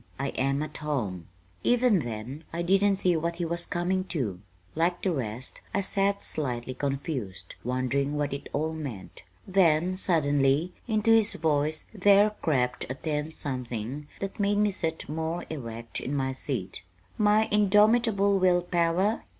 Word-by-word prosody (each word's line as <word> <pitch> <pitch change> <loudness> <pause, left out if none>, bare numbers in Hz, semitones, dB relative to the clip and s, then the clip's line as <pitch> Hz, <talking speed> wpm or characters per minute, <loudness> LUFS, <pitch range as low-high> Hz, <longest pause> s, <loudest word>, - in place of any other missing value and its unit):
I 140 +1 -2
am 140 +2 0
at 155 0 -7
home." 110 - -3 0.4
Even 245 -5 +4
then 120 +3 -5
I 170 +1 -2
didn't 195 +3 +3
see 185 -2 +2
what 170 +1 -1
he 175 0 -2
was 170 +1 -2
coming 185 +2 0
to. 120 - -2 0.3
Like 170 +3 0
the 190 - +2
rest 125 -4 -4
I 200 - +2
sat 200 +1 +1
slightly 130 -4 -2
confused, 135 - -4
wondering 130 +4 0
what 145 -2 -1
it 140 - -6
all 155 +2 -1
meant. 135 -12 -7 0.3
Then, 180 -2 +3
suddenly, 145 -2 +2
into 220 -1 +2
his 225 -1 +5
voice 155 -1 0
there 205 +1 +5
crept 125 -6 0
a 130 - -3
tense 150 +2 -3
something 125 +1 -4
that 195 +1 -5
made 205 0 +2
me 210 0 +3
sit 165 -4 -2
more 160 +3 -3
erect 115 -5 -5
in 140 - -3
my 130 -1 0
seat. 130 -7 -4 0.4
"My 215 +1 +4
indomitable 210 0 +4
will 180 -1 +3
power? 175 +5 +1
160 Hz, 150 wpm, -28 LUFS, 135-190 Hz, 0.4 s, his